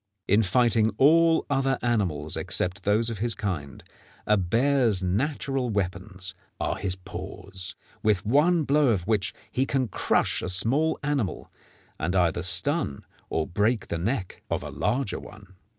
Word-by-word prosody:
In 105 +3 +4
fighting 110 +2 +3
all 165 +3 +5
other 135 -2 +1
animals 90 -11 0
except 90 +1 0
those 110 +3 +2
of 110 - -6
his 115 +1 0
kind, 80 -10 -4 0.4
a 105 - +4
bear's 115 +1 +2
natural 130 - -1
weapons 95 -1 -3 0.3
are - - -1
his 95 -2 0
paws, 95 0 -8 0.3
with 105 -3 +1
one 155 +8 +3
blow 145 0 +3
of 100 -8 +1
which 105 -2 +1 0.2
he 130 +2 0
can 130 -2 0
crush - - +1
a 90 - -3
small 130 +12 +2
animal, 140 -9 -2 0.5
and 90 +4 -1
either 85 -1 +2
stun 95 - +1 0.2
or 80 - 0
break 105 +7 0
the 85 - -2
neck 100 +1 -3
of - - -1
a - - -6
larger 120 +1 -1
one. 105 -3 -13
105 Hz, 150 wpm, -26 LUFS, 95-135 Hz, 0.5 s, all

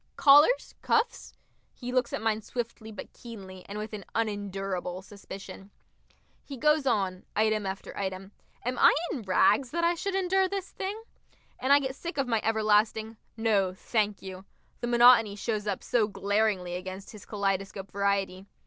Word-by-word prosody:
"Collars, 295 - +6
cuffs?" 455 +2 0 0.4
He 250 -1 -6
looks 250 -1 +1
at - - -3
mine 220 -1 +1
swiftly 230 -1 -5
but 210 - -9
keenly, 190 -6 -10
and 205 - -5
with 215 +1 -6
an 205 -2 -6
unendurable 195 -4 -3
suspicion. 195 -1 -10 0.7
He 275 - -8
goes 300 +2 +2
on, 190 -6 0
item 215 -1 +1
after 190 +1 -6
item. 190 0 -4 0.3
Am 250 +1 -2
I - - +7 0.2
in 260 - -3
rags, 215 +6 +3
that 335 +5 -2
I 340 +1 +4
should 385 +3 -3
endure 380 0 +2
this 390 -1 -4
thing? 395 +3 -4 0.6
And 260 - 0
I 285 - +8
get 265 -2 -3
sick 340 +3 -6
of 275 -2 0
my 225 -3 +1
everlasting 220 0 +2 0.2
"No, 200 -5 +1
thank 210 0 -1
you" 190 0 -8 0.4
the 240 - -3
monotony 240 -3 +6
shows 210 0 -3
up 200 -2 -2
so 225 -4 +2
glaringly 205 -3 0
against 185 +2 -6
his 210 -3 -13
kaleidoscope 195 -1 -2
variety. 200 -1 -1
215 Hz, 160 wpm, -28 LUFS, 195-250 Hz, 0.7 s, I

